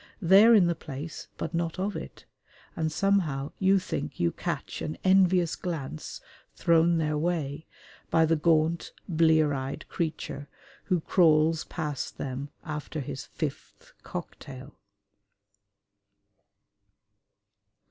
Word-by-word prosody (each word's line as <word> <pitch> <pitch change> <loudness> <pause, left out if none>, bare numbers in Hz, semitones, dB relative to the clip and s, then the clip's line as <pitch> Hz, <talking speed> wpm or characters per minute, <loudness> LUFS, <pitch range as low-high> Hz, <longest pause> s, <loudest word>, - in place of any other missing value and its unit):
They 190 +1 +7
are 230 0 +8
in 195 -5 +6
the 170 - +2
place 150 0 -7
but - - -4
not 165 0 -1
of 195 +2 -2
it, - - -8 0.5
and 160 -1 -1
somehow 160 -7 +1
you 190 +1 +4
think 145 -6 -4
you 85 -1 +2
catch - - -4
an 155 - -4
envious 185 -3 +4
glance 150 - -5 0.3
thrown 170 0 +3
their 150 -2 0
way 160 -2 -2 0.4
by 165 0 +4
the 165 +1 +2
gaunt, 160 +1 +1
blear 160 -3 +3
eyed 135 0 -4
creature 155 -3 -4 0.4
who 180 -4 +1
crawls 160 -2 +3
past 150 -5 -4
them 135 +1 -4 0.2
after 150 0 -5
his 135 - -5
fifth - - -6
cocktail. - - -8
160 Hz, 115 wpm, -28 LUFS, 150-175 Hz, 0.5 s, are